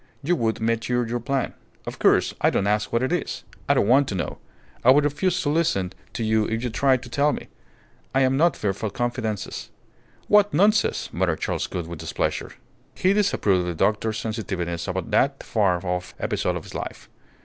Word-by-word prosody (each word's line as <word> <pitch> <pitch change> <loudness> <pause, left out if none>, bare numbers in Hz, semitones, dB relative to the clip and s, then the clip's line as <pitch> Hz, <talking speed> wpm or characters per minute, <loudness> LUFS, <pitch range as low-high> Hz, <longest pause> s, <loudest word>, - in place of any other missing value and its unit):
You 175 +5 +2
would 115 -6 0
mature 115 +2 0
your 120 +1 -2
plan. 135 +2 -1 0.3
Of - - -7
course, - - +3
I - - +5
don't 100 - 0
ask 105 +1 0
what 115 +2 +1
it 130 - 0
is. 175 - -2 0.3
I - - +5
don't - - +2
want 135 +4 +5
to 100 - -3
know. 90 - -3 0.4
I 125 - +5
would 140 +3 +7
refuse 175 +6 0
to 145 - 0
listen 145 - +1 0.2
to 115 - -3
you 110 0 +2
if 115 +2 -2
you 125 - -2
tried 130 +1 +2
to 125 - -10
tell 145 +4 +2
me. - - -6 0.7
I 135 - +4
am 130 0 +3
not 165 +2 +3
fit 100 -2 -1
for 110 +1 -3
confidences." 115 -3 -3 0.6
"What 205 -4 +4
nonsense!" 205 +4 +2
muttered - - 0
Charles - - -1
Gould, 85 - -4
with 85 -1 -8
displeasure. - - -2 0.4
He 185 +2 +3
disapproved 195 - +2
of 90 - -2
the 85 - -3
doctor's 110 +5 +1
sensitiveness 95 -7 -3
about 95 +4 -3
that 135 +6 +2
far 95 -5 +1
off 90 0 -3
episode - - -1
of - - -5
his - - -11
life. - - -6
115 Hz, 200 wpm, -24 LUFS, 100-140 Hz, 0.7 s, would